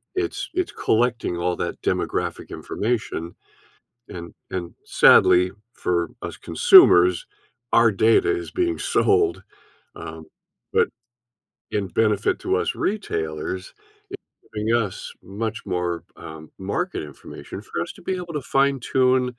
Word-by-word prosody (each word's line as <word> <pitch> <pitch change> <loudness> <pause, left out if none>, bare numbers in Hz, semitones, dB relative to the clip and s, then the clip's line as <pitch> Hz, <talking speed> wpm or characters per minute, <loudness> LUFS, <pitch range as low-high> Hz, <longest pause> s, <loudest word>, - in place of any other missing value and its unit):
it's 380 +1 -2
it's 365 +1 -1
collecting 115 -6 0
all 90 0 0
that - - -4
demographic - - -2
information. 105 -7 -3 0.8
And 85 -1 -9 0.2
and, 85 -2 -5
sadly, 90 +1 +5 0.2
for 85 -2 -1
us - - -6
consumers, 90 0 +6 0.5
our 115 -1 +6
data 110 - +3
is - - -9
being 350 -2 -1
sold, 410 -2 +2 0.5
um, - - -9 0.5
but 460 0 +4 0.8
in 105 -2 -1
benefit 105 +2 +1
to - - 0
us - - -1
retailers, 90 - -3 0.4
it's 395 - -8 0.3
giving 105 +1 -2
us 105 -5 -3
much 110 +3 -5
more, 90 -2 -2
um, 80 0 -10
market 100 - -3
information 75 -2 -10
for - - -5
us - - -4
to - - -16
be 190 - -1
able 175 -2 -6
to 150 - -2
fine 135 0 +1
tune 130 +1 +2
110 Hz, 125 wpm, -23 LUFS, 90-140 Hz, 0.8 s, consumers